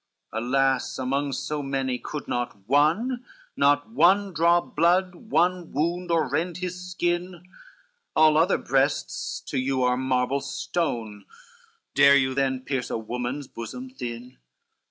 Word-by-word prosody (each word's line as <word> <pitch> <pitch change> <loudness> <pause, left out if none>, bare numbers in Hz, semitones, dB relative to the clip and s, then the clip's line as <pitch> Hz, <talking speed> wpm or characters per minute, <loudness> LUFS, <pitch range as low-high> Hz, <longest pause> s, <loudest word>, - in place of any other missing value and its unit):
CXXIV - - -3
Alas, 135 +1 +1
among 140 +2 -1
so 150 +3 -3
many, 135 -2 -2
could 150 - -6
not 115 -5 -4
one, 170 - +2 0.3
Not 145 +8 +2
one 195 -1 +3
draw 170 +2 +4
blood, 175 +3 +1 0.2
one 180 -1 +1
wound 170 +5 -1
or 165 -3 +2
rend 160 +6 -1
his 180 0 -5
skin? 175 0 -2 0.7
All 155 -1 +6
other 165 +5 +4
breasts 135 +3 -1
to - - -3
you 130 0 0
are 125 0 +2
marble 130 +1 0
stone, 120 - -3 0.7
Dare 140 0 +7
you 130 -1 +1
then 130 -1 0
pierce 130 -1 -3
a - - -1
woman's 125 +5 -4
bosom 250 - -8
thin? 125 - -7
145 Hz, 135 wpm, -25 LUFS, 130-175 Hz, 0.7 s, Dare